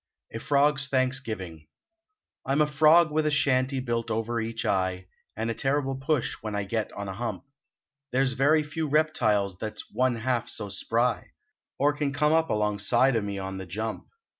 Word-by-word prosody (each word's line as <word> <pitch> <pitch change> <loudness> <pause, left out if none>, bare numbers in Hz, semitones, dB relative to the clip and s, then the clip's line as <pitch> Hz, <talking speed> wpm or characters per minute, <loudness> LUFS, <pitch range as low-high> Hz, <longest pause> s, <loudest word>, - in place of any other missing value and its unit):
A 115 - -4
FROG 145 +2 +2
S 135 - -1
THANKSGIVING 115 - -2 0.8
I 135 - -1
m 145 - +3
a - - +5
frog 155 +2 +5
with 155 0 +1
a - - +3
shanty 135 -2 +1
built 120 -2 -2
over 115 +1 -1
each 115 0 -4
eye 95 -1 0 0.3
And 115 +1 -1
a - - -1
terrible 135 +2 0
push 135 0 -1
when 110 -1 -4
I 100 - -1
get 110 +2 -2
on 100 0 -6
a 95 - -4
hump, 120 +4 -4 0.7
There 130 +2 +2
s 130 - +1
very 150 +4 +3
few 150 +2 -3
reptiles 105 -11 +1
that 110 -1 -4
s - - -7
one 130 -1 +1
half 120 0 -1
so 105 -2 -5
spry 115 +5 -1 0.4
Or 145 +1 +3
can 145 -2 -2
come 150 +2 +2
up 160 0 +2
along 105 -1 0
side 120 +5 +3
o 115 - +2
me 100 -1 -4
on 95 0 -5
the 95 - -7
jump. 110 +5 -4
125 Hz, 195 wpm, -27 LUFS, 105-140 Hz, 0.8 s, a